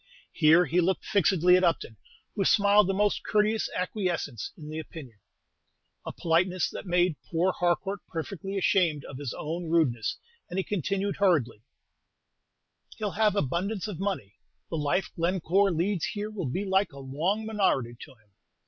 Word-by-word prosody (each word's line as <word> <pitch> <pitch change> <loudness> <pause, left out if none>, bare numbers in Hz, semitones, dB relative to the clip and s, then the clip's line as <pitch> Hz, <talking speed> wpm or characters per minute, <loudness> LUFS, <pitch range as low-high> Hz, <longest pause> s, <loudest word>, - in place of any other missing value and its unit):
Here 160 +4 +5
he 180 +1 +2
looked 185 +2 0
fixedly 180 -2 +4
at 185 - 0
Upton, 165 -9 0 0.4
who 200 - 0
smiled 205 0 +4
a - - +2
most 205 +1 +1
courteous 215 +1 +1
acquiescence 180 - -2
in 150 - -10
the 155 - -4
opinion, 140 -8 -10 0.9
a - - -2
politeness 180 +2 +1
that - - -8
made 175 -3 +2
poor 175 +3 +2
Harcourt 180 +3 -1
perfectly 195 +4 -5
ashamed 175 -6 +2
of 130 - -8
his 140 -4 -4
own 165 +2 -4
rudeness, 130 -10 +1 0.3
and 180 - -5
he 190 - +1
continued 200 +1 -2
hurriedly, 155 - +2 1.4
"He'll 210 -2 -2
have 210 0 +2
abundance 195 +5 -1
of 195 -6 -6
money. 190 - -3 0.3
The 165 - -1
life 150 +5 0
Glencore 185 +3 +2
leads 175 +2 0
here 210 +1 -4
will 185 -10 -4
be 190 +11 -2
like 190 -1 +1
a - - -12
long 165 +11 -2
minority 190 - 0
to 145 - -11
him. 110 -3 -32
180 Hz, 155 wpm, -27 LUFS, 155-200 Hz, 1.4 s, Here